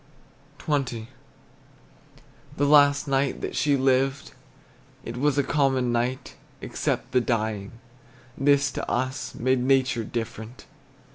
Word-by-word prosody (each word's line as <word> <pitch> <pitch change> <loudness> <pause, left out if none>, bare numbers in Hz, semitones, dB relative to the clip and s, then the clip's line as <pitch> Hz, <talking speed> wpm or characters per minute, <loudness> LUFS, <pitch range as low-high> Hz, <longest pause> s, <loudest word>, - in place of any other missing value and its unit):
XX. 130 -7 -2 1.5
The 145 - +2
last 145 0 +5
night 135 0 0
that - - -4
she 145 -2 +2
lived, 135 +1 +1 0.7
It 115 - -6
was 145 +2 +1
a 140 - +3
common 135 -4 +1
night, 120 +2 -2 0.2
Except - - -3
the 125 +1 +3
dying; 110 -4 -2 0.6
this 140 0 +2
to - - -5
us 130 +2 -2
Made 130 +2 +1
nature 130 -2 +2
different. 115 +1 -6
130 Hz, 115 wpm, -25 LUFS, 120-140 Hz, 1.5 s, last